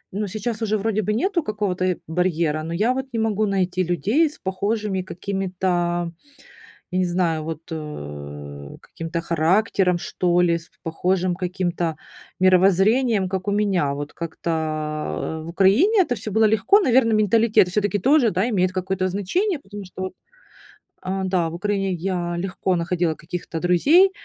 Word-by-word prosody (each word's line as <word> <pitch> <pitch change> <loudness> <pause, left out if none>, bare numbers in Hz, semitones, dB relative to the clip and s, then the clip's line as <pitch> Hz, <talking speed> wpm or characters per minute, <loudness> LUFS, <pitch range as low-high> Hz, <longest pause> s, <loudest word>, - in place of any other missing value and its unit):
Ну, 210 +1 -1
сейчас 215 +3 -4
уже 215 -1 +1
вроде 215 +1 0
бы 210 - -1
нету 345 - +1
какого-то, 205 - -2
э, 185 -2 0
барьера, 165 -2 0
но 165 - -5
я 215 +8 +2
вот 265 0 -3
не 230 - -1
могу 215 -1 +1
найти 185 -2 0
людей 210 - +2
с 295 - -12
похожими 200 +1 -2
какими-то, 190 0 -4 1.2
я 185 - 0
не 185 - +2
знаю, 170 -3 0
вот, 160 -1 -5
э, 75 - -7
каким-то 165 +1 -5
характером, 180 +3 +2
что 175 0 +1
ли, 170 -1 +3
с 165 - -15
похожим 180 +2 0
каким-то 175 -2 -2 0.5
мировоззрением, 195 +4 +4
как 190 +1 -3
у - - +2
меня. 195 -8 +1
Вот 145 +1 -5
как-то 160 -1 -3
в - - -9
Украине 220 - +4
это 245 - -2
всё 215 0 -5
было 220 +1 +4
легко. 220 - +4
Наверное, 250 - +3
менталитет 215 -2 +4
всё-таки 205 +1 0
тоже, 270 +1 +4
да, 185 +4 +1
имеет 185 -4 +1
какое-то 185 0 -1
значение, 285 - -1
потому 205 -4 -9
вот 190 - -9
что 185 +1 -5 0.9
А, 190 +1 -3
да, 180 -3 +1
в - - -9
Украине 195 +1 -1
я 175 -1 -2
легко 185 0 -1
находила 170 -1 0
каких-то 170 0 -6
друзей- 295 - +5
185 Hz, 155 wpm, -22 LUFS, 170-210 Hz, 1.2 s, друзей